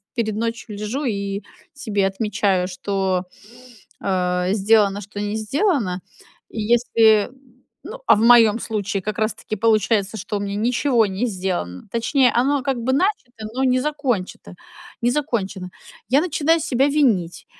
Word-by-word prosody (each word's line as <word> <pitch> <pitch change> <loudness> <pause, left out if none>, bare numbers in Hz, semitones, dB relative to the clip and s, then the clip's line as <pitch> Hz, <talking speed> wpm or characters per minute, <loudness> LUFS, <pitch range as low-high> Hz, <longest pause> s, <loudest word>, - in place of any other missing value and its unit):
перед 220 -3 -1
ночью 230 0 -4
лежу 220 +8 -3
и 200 -2 -3 0.3
себе 210 -9 -1
отмечаю, 195 -2 0
что, 190 0 -2 0.8
э, 180 -1 0
сделано, 205 -1 +3
что 205 +1 -9
не 210 +1 -2
сделано. 220 - 0 0.5
Если 225 0 +3 0.6
ну, - - -8
а - - +7
в 210 - -1
моём 230 -1 +6
случае 205 -2 -3
как 215 +1 -4
раз 215 0 +1
таки 215 - -6
получается, 215 -1 +1
что 205 +1 -4
у - - -4
меня 200 0 -3
ничего 235 +1 +2
не 195 +6 -2
сделано, 180 - -3
точнее, 245 +3 +2
оно 270 +3 +1
как 270 -3 -1
бы 260 +3 0
начато, 265 - -1
но 260 +2 -1
не 255 -1 +3
закончето 255 -12 -3 0.5
не 240 +1 +2
закончено, 200 -10 -2 0.4
я 275 +4 +4
начинаю 325 -1 +1
себя 275 -2 +1
винить, 230 - +1
220 Hz, 145 wpm, -21 LUFS, 200-250 Hz, 0.8 s, а